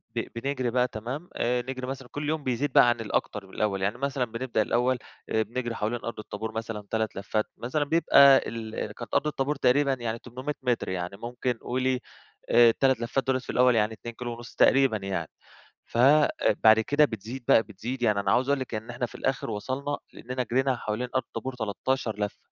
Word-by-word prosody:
ب 115 Hz, -, -2 dB
بنجري 130 Hz, -1 st, -1 dB
بقى 125 Hz, +1 st, +2 dB
تمام 125 Hz, +10 st, -6 dB
آآ 125 Hz, +1 st, +1 dB
نجري 130 Hz, +1 st, -5 dB
مثلًا 130 Hz, -1 st, -6 dB
كل 145 Hz, 0 st, -3 dB
يوم 155 Hz, -1 st, -1 dB
بيزيد 130 Hz, +2 st, -1 dB
بقى 120 Hz, -, +7 dB
عن 120 Hz, -1 st, 0 dB
الأكتر 105 Hz, -2 st, -2 dB
من 95 Hz, -, -18 dB
الأول. 100 Hz, -3 st, -1 dB
يعني 100 Hz, +2 st, 0 dB
مثلًا 135 Hz, -1 st, -1 dB
بنبدأ 115 Hz, 0 st, -2 dB
الأول 125 Hz, +4 st, +1 dB, 0.3 s
بنجري 120 Hz, +2 st, -1 dB
حوالين 115 Hz, +3 st, -2 dB
أرض 115 Hz, -, -5 dB
الطابور 110 Hz, +1 st, -5 dB
مثلًا 110 Hz, -1 st, -5 dB
3 110 Hz, -1 st, -1 dB
لفات، 105 Hz, +2 st, -1 dB
مثلًا 140 Hz, +5 st, -1 dB
بيبقى 140 Hz, -3 st, +7 dB
ال 110 Hz, -2 st, -5 dB
كانت 115 Hz, 0 st, -9 dB
أرض 150 Hz, -, +2 dB
الطابور 145 Hz, 0 st, -1 dB
تقريبًا 140 Hz, +1 st, +3 dB
يعني 115 Hz, -3 st, -3 dB
800 130 Hz, +5 st, -5 dB
متر، 125 Hz, -2 st, 0 dB
يعني 90 Hz, +1 st, -4 dB
ممكن 120 Hz, +1 st, -2 dB
قولي 130 Hz, +2 st, -1 dB, 0.5 s
آآ 120 Hz, 0 st, +7 dB
ال3 130 Hz, +2 st, +2 dB
لفات 125 Hz, +3 st, -1 dB
دُولَة 130 Hz, -1 st, +2 dB
في 130 Hz, -, -15 dB
الأول 125 Hz, -1 st, +4 dB
يعني 105 Hz, 0 st, +2 dB
2 115 Hz, +2 st, -8 dB
كيلو 120 Hz, -1 st, -5 dB
ونص 120 Hz, 0 st, -11 dB
تقريبًا 135 Hz, -4 st, +4 dB
يعني. 95 Hz, -5 st, -3 dB, 0.6 s
ف -, -, -9 dB
آآ 145 Hz, +4 st, +6 dB, 0.3 s
بعد 110 Hz, 0 st, +8 dB
كده 145 Hz, +6 st, +3 dB
بتزيد 115 Hz, +1 st, -5 dB
بقى، 115 Hz, -, +6 dB
بتزيد 120 Hz, +4 st, -6 dB
يعني 105 Hz, -4 st, +3 dB
أنا 100 Hz, -, 0 dB
عاوز 130 Hz, +5 st, +2 dB
أقول 140 Hz, -1 st, +2 dB
لكِ 130 Hz, -2 st, -5 dB
إن 110 Hz, +2 st, -5 dB
إحنا 120 Hz, 0 st, -2 dB
في -, -, -17 dB
الآخر 135 Hz, -1 st, -2 dB
وصلنا، 135 Hz, +7 st, -3 dB
لإننا 125 Hz, +1 st, -4 dB
جرينا 130 Hz, +1 st, +1 dB
حوالين 110 Hz, +4 st, -3 dB
أرض 130 Hz, -, +2 dB
الطابور 130 Hz, +2 st, -6 dB
13 110 Hz, 0 st, -2 dB
لفة. 105 Hz, -, -2 dB
120 Hz, 200 wpm, -27 LUFS, 110-130 Hz, 0.6 s, بعد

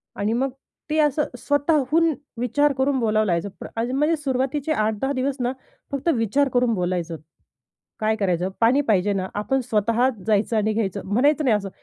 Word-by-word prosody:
आणि 205 Hz, +2 st, -1 dB
मग 265 Hz, +3 st, 0 dB, 0.4 s
ते 305 Hz, -, 0 dB
असं 300 Hz, 0 st, +3 dB
स्वतःहून 300 Hz, +3 st, +2 dB, 0.3 s
विचार 290 Hz, +4 st, +2 dB
करून 265 Hz, 0 st, +1 dB
बोलावं 215 Hz, -2 st, +2 dB
लागायचं 175 Hz, +1 st, 0 dB
पण -, -, -6 dB
आधी 235 Hz, +2 st, -1 dB
म्हणजे 300 Hz, +5 st, +2 dB
सुरुवातीचे 270 Hz, +2 st, -1 dB
8-10 220 Hz, +1 st, 0 dB
दिवस 265 Hz, +1 st, -1 dB
ना 245 Hz, 0 st, 0 dB, 0.4 s
फक्त 280 Hz, +4 st, -1 dB
विचार 245 Hz, +5 st, +1 dB
करून 245 Hz, -2 st, +2 dB
बोलायचं. 175 Hz, -3 st, -2 dB, 0.8 s
काय 220 Hz, 0 st, +1 dB
करायचं 185 Hz, -4 st, 0 dB
पाणी 240 Hz, +5 st, +4 dB
पाहिजे 205 Hz, -1 st, +3 dB
ना 190 Hz, -2 st, -1 dB
आपण 265 Hz, +6 st, 0 dB
स्वतःच 230 Hz, +1 st, +1 dB
जायचं 220 Hz, +1 st, +2 dB
आणि 215 Hz, 0 st, +1 dB
घ्यायचं 205 Hz, -3 st, -1 dB
म्हणायचं 285 Hz, +10 st, +2 dB
नाही. 235 Hz, -5 st, +4 dB
असं 200 Hz, -1 st, -4 dB
240 Hz, 165 wpm, -23 LUFS, 210-275 Hz, 0.8 s, पाणी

